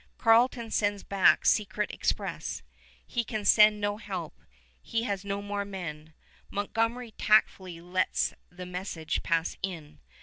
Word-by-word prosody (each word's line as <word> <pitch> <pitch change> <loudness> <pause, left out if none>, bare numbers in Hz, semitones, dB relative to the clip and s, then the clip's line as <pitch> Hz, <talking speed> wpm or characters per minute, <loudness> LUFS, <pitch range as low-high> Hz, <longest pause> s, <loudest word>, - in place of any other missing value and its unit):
Carleton 230 0 +3
sends 205 -1 0
back 195 -2 +3
secret 210 0 +1
express. - - -3 0.4
He 240 - -2
can 215 -2 -4
send 210 0 +6
no 205 0 -1
help. 190 -7 -6 0.5
He 230 0 -2
has 200 -4 -2
no 200 0 -3
more 205 0 -2
men. 160 -6 -7 0.3
Montgomery 225 +4 -2
tactfully 190 -5 +2
lets 180 +2 0 0.2
the 180 +1 -9
message 180 -3 -4
pass 165 -1 0
in. 165 - -6
200 Hz, 130 wpm, -28 LUFS, 180-215 Hz, 0.5 s, send